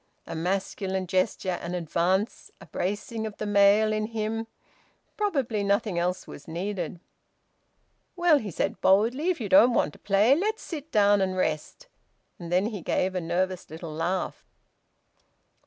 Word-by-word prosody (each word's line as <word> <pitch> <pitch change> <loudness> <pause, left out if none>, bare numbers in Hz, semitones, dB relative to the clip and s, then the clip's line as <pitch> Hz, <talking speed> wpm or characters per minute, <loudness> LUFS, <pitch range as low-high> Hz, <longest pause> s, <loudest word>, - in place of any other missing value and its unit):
A - - -7
masculine 190 +2 -2
gesture, 185 0 0
an 175 +1 -4
advance, 180 - -1
a - - -12
bracing 210 +4 -3
of 210 - -9
the - - -4
male 205 +1 +4
in 215 0 -1
him... 225 0 -3 0.7
probably 270 - 0
nothing 200 -2 +1
else 180 +1 -1
was 145 - -11
needed. 175 0 -4 1.2
"Well," 345 -4 +4
he 215 - -5
said 195 +5 -2
boldly, 230 - +3
"if 360 - 0
you 220 - -3
don't 250 -1 +6
want 150 - +1
to - - -16
play, 205 +5 +4
let's 425 +8 -1
sit 315 -2 -7
down 205 -1 +4
and 185 -1 0
rest." 160 - -2 0.5
And 170 -1 -7
then 180 +3 +3
he 215 -4 -4
gave 185 +3 0
a 180 - -2
nervous 180 +2 -2
little 160 0 -7
laugh. 175 +4 -2
200 Hz, 155 wpm, -27 LUFS, 180-225 Hz, 1.2 s, don't